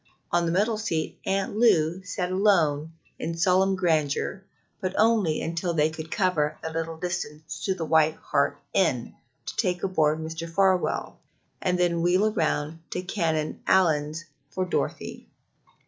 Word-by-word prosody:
On 175 0 +2
the - - +1
middle 210 +5 +1
seat 160 -7 -2
Aunt 195 +1 0
Lou 175 -6 +3
sat 185 -1 -3
alone 165 -6 +2 0.3
in 165 +1 -3
solemn 190 +2 +3
grandeur, 165 +1 0 0.4
but 185 -2 -3
only 215 -8 +3
until 170 +1 -2
they 155 0 +3
could 160 0 -7
cover 180 -7 +1
the 160 - -3
little 165 0 -3
distance 160 -3 -5
to 190 - +1
the 165 - -3
White 160 0 +3
Hart - - 0 0.2
Inn - - +1 0.3
to - - -6
take 180 -4 0
aboard 155 -5 +2
Mr. 160 +1 -5
Farwell, 190 +1 +1 0.4
and 180 -1 +1
then 175 -1 +1
wheel 185 +5 +3
round 155 -2 -1
to 180 - -3
Canon 160 -5 -1
Allyn's 160 -3 +2 0.2
for 185 +4 -2
Dorothy. 180 - -3
170 Hz, 145 wpm, -26 LUFS, 160-190 Hz, 0.4 s, Lou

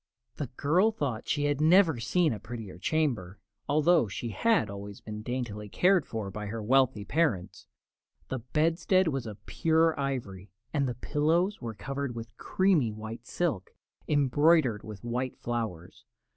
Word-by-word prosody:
The 145 - -3
girl 175 +9 +3
thought 135 - -3
she 145 - 0
had 145 0 0
never 165 -3 +5
seen 155 +6 +2
a 105 - -6
prettier 110 -5 -8
chamber, 115 - -1 0.3
although 155 -2 +4
she 115 +4 -5
had 225 - +2
always 100 0 -8
been 105 0 -7
daintily 110 -3 -4
cared 185 - +3
for 110 -4 -4
by 105 +2 -5
her 115 +3 -4
wealthy 125 -1 +2
parents. 135 - -1 0.6
The 130 - -2
bedstead 165 - +2
was 135 -5 -3
of 105 -1 -10
pure 160 0 +2
ivory, 110 -9 -4 0.2
and 140 -3 +1
the 120 - -4
pillows 165 - +1
were 115 -3 -5
covered 135 +4 -4
with 115 -1 -8
creamy 180 - +2
white 110 +3 -8
silk, 150 - -2 0.3
embroidered 145 -4 +3
with 105 -3 -10
white 125 +2 -3
flowers. 110 -8 -4
125 Hz, 150 wpm, -29 LUFS, 110-155 Hz, 0.6 s, never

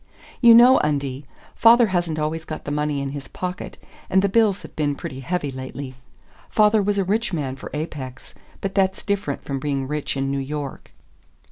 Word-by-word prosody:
"You 235 -2 +9
know, 245 +3 +8
Undie, 140 -2 -2 0.3
father 235 +1 +6
hasn't 175 -4 -1
always 155 +1 -2
got 155 -1 -7
the 145 - -3
money 150 -1 -1
in 140 - -3
his 140 -1 -7
pocket, 180 0 -6 0.3
and 190 +1 +3
the 200 - +2
bills 210 -2 +2
have - - -12
been 145 -2 0
pretty 130 -1 -7
heavy 145 +1 -2
lately. 130 +1 -7 0.6
Father 215 0 +4
was 200 +1 0
a 195 - +2
rich 210 +2 -1
man 140 -5 -2
for - - -9
Apex, 140 -4 -6 0.3
but 195 -1 -3
that's 190 -1 +1
different 200 -9 -2
from 135 -1 -3
being 135 -1 -2
rich 150 -1 -3
in 135 0 -1
New 140 - -1
York." 140 0 -5
150 Hz, 190 wpm, -22 LUFS, 140-195 Hz, 0.6 s, You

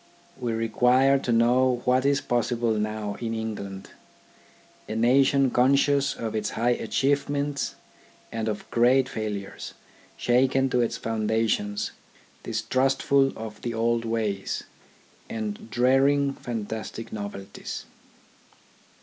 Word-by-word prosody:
"We 120 -3 -2
require 125 +4 +3
to 125 - -2
know 120 +2 +3
what 130 +2 +3
is 140 -1 +2
possible 120 -1 0
now 105 -1 -2
in 115 -1 -3
England, 100 -3 -5 1.0
a 110 - -3
nation 130 +3 +4
conscious 140 +2 +3
of 115 -2 -4
its 110 -1 -1
high 120 +2 +2
achieve 140 +5 0
ments, 145 0 -2 0.6
and 115 -1 -3
of 105 -1 -3
great 125 +2 +4
failures, 105 -5 -5 0.4
shaken 130 +2 +2
to 125 - +3
its 115 0 -1
founda 110 0 0
tions, 105 -1 -1 0.5
distrustful 135 +4 +1
of 110 -1 -8
the 120 -1 -3
old 115 +1 +1
ways, 110 -4 -2 0.7
and 110 0 -5
dreading 135 +4 +3
fantastic 110 -2 -6
novelties. 100 -2 -6
115 Hz, 115 wpm, -26 LUFS, 110-130 Hz, 1.0 s, nation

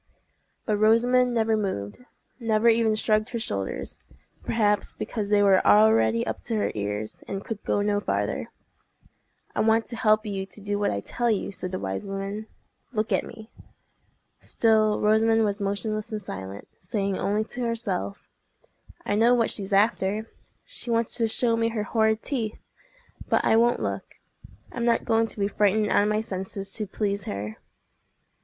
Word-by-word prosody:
But 210 -2 +1
Rosamond 245 +4 +4
never 225 -1 +2
moved—never 215 - -3
even 225 -1 +3
shrugged 215 +1 +1
her 240 - -3
shoulders—perhaps 100 - -3
because 210 -3 -4
they 205 -1 +4
were 195 -2 +5
already 110 +2 +5
up - - -3
to 230 - -2
her 210 - 0
ears, 105 +1 -4
and 195 0 -5
could 220 -3 -5
go 205 - +1
no 205 0 +1
farther. - - -2 1.1
"I - - -1
want 225 +1 +3
to 240 - -7
help 215 -1 +3
you 195 -2 -3
to 210 - -10
do 205 0 -2
what 205 - +1
I 100 - -2
tell 240 - -1
you," 210 -3 0
said 185 -1 -5
the 185 - -2
wise 95 - -4
woman. 195 +2 -4 0.4
"Look 215 -3 -2
at - - +2
me." 220 +1 -11 0.9
Still 215 -2 +2
Rosamond 225 +1 +3
was 205 -1 -1
motionless 205 +2 -2
and 215 - -2
silent, 95 - -8
saying 195 +1 -2
only 210 +2 +1
to 245 +3 -7
herself, 230 - -3 0.8
"I - - 0
know 230 +4 +5
what 230 -2 +2
she's 195 -1 -4
after! 205 +1 +1 0.3
She - - -7
wants 230 -1 +1
to 230 -2 +2
show 230 +1 +1
me 230 0 +1
her 225 -2 -2
horrid 220 0 +1
teeth. 230 -7 -4 0.6
But - - +2
I - - +4
won't 235 +1 +3
look. - - -4 0.6
I'm 240 - -4
not 235 -1 +2
going 225 0 +2
to 220 - -6
be 200 - +2
frightened 210 +1 +2
out - - +5
of 205 - +1
my 215 0 +1
senses 195 -2 -5
to 215 0 -3
please 200 0 -2
her." 105 +2 -5
215 Hz, 165 wpm, -26 LUFS, 195-225 Hz, 1.1 s, were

